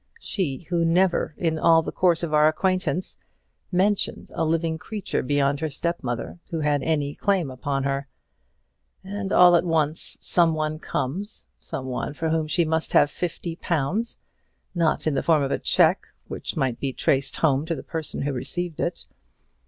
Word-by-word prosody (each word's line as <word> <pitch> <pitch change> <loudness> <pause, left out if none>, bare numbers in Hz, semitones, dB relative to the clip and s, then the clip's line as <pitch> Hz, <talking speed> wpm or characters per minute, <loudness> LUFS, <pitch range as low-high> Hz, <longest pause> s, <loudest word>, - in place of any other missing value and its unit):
She 160 -7 -3
who 170 -1 +2
never, 175 -1 +2
in 160 -2 0
all 165 0 +5
the - - -4
course 175 -2 +2
of 160 -2 -2
our 150 0 +6
acquaintance, 185 +2 -1 0.5
mentioned 195 +3 0
a - - -1
living 160 0 0
creature 210 +1 -3
beyond 140 +1 +1
her 160 0 -2
step 170 +4 -2
mother 120 +6 -4
who 165 -3 -2
had 145 -1 +1
any 145 -1 0
claim 185 -7 0
upon 135 +2 -2
her; 140 0 -1 1.0
and 195 0 -4
all 180 -1 +7
at 170 - +4
once 160 -2 -1
some 170 -2 +3
one 155 0 -2
comes 185 +13 -4
some 130 - -5
one 130 +3 -3
for 160 +2 -1
whom 160 -1 0
she 170 +2 +2
must 160 0 -1
have 145 - +5
fifty 170 -1 -4
pounds; 175 +10 -1 0.6
not 170 -3 +1
in 155 - +1
the 135 - +1
form 155 -3 +3
of 135 - -2
a - - 0
cheque, - - +3 0.2
which - - -5
might 130 -5 0
be 135 -2 -2
traced 135 +1 0
home 140 -3 +2
to 165 - -1
the 130 - -8
person 160 -5 -3
who 145 0 -1
received 170 +6 -3
it. - - -2
160 Hz, 175 wpm, -24 LUFS, 145-175 Hz, 1.0 s, all